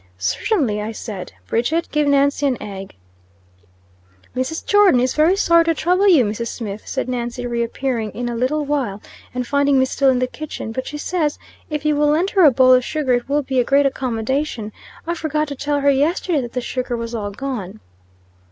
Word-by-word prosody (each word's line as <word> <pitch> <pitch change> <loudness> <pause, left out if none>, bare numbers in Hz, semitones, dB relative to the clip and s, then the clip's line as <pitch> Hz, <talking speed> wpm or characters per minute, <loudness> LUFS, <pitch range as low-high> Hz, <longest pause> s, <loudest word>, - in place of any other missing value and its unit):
"Certainly," 210 - 0
I 215 +2 -4
said. 210 -4 -7
"Bridget, 305 - 0
give 300 -1 +1
Nancy 285 0 +3
an 255 -3 0
egg." 195 -2 -8 1.4
"Mrs. 260 +6 -3
Jordon 410 -10 +5
is 255 +1 +1
very 315 +5 +4
sorry 335 -4 +4
to 330 0 +1
trouble 365 +6 +2
you, 315 - +6
Mrs. 215 +3 -3
Smith," 210 -4 -6
said 265 - -2
Nancy, 245 0 -3
re 235 -1 -1
appearing 235 -1 -2
in 245 +1 -4
a 240 - -3
little 280 +6 0
while, 265 -9 -1 0.3
and 250 0 -3
finding 280 +1 +2
me 260 - +4
still 270 +1 +2
in 260 - +3
the 255 - +1
kitchen, 270 -3 -7
"but 260 +3 -4
she 295 - -5
says 305 -1 -1 0.3
if 300 -1 -4
you 300 -1 +3
will 295 0 +2
lend 325 +6 +2
her 385 -3 +4
a 305 - +9
bowl 255 0 +5
of 255 0 +4
sugar 285 -2 -1
it 245 +1 -1
will 290 +1 +1
be 265 -1 0
a - - +4
great 280 +3 +3
accommodation. 255 -2 -2 0.3
I 340 - -1
forgot 310 -2 -1
to 285 - -5
tell 285 +1 -1
her 280 0 +4
yesterday 300 +3 +1
that 240 -2 -7
the 250 - -2
sugar 250 0 -3
was 230 0 -5
all 210 -3 -3
gone." 205 - -5
265 Hz, 205 wpm, -20 LUFS, 235-300 Hz, 1.4 s, a